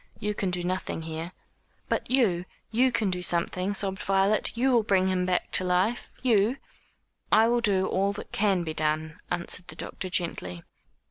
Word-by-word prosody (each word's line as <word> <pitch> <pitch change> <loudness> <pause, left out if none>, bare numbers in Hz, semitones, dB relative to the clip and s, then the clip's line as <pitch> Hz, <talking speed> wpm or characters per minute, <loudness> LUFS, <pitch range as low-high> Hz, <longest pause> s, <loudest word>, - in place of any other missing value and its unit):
"You 210 0 -1
can 195 -2 -1
do 180 -1 -1
nothing 180 -2 -2
here." 160 +2 -5 0.6
"But - - -1
you 210 -9 +2 0.3
you 250 +3 +3
can 210 -5 +1
do 180 0 -2
something," 180 +3 0
sobbed 190 -1 -2
Violet, 195 +2 +2
"you 260 +3 +2
will 240 -2 +5
bring 190 -3 +2
him 180 -1 0
back 180 -1 0
to - - +3
life 185 +6 0
you 230 0 +3 0.4
" - - -47 0.3
"I 220 +1 +6
will 240 0 +2
do 195 -4 +2
all 195 +1 +1
that 205 - -8
can 195 -4 +2
be 160 -2 -4
done," 155 0 -1
answered 175 +1 -2
the - - -9
doctor 185 - -5
gently. 90 - -2
190 Hz, 185 wpm, -27 LUFS, 175-210 Hz, 0.6 s, I